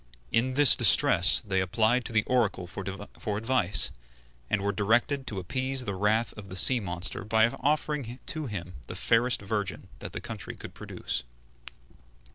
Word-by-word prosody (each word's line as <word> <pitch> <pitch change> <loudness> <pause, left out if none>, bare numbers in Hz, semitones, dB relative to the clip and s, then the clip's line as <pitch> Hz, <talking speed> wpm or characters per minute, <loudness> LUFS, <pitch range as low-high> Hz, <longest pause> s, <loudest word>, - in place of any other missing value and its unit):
In 130 +3 0
this 145 -2 +8
distress 90 +6 +5
they 95 -2 0
applied 110 +6 +1
to - - -6
the 110 -1 +2
Oracle 115 -7 0
for 100 +2 -7
advice, 110 -5 +1 0.6
and 105 - 0
were 100 - 0
directed 120 +7 0
to 105 - -5
appease 130 +8 -2
the 100 - -3
wrath 105 +4 0
of 100 -2 -11
the 95 - -8
sea 125 +7 +7
monster 90 -3 -2
by 110 +1 +3
offering 145 -4 -2
to 155 -3 -4
him 90 -5 -7
the - - -7
fairest 115 -1 +1
virgin 100 -1 -4
that - - -8
the - - -4
country - - -8
could - - -11
produce. - - -5
110 Hz, 160 wpm, -27 LUFS, 95-125 Hz, 0.6 s, this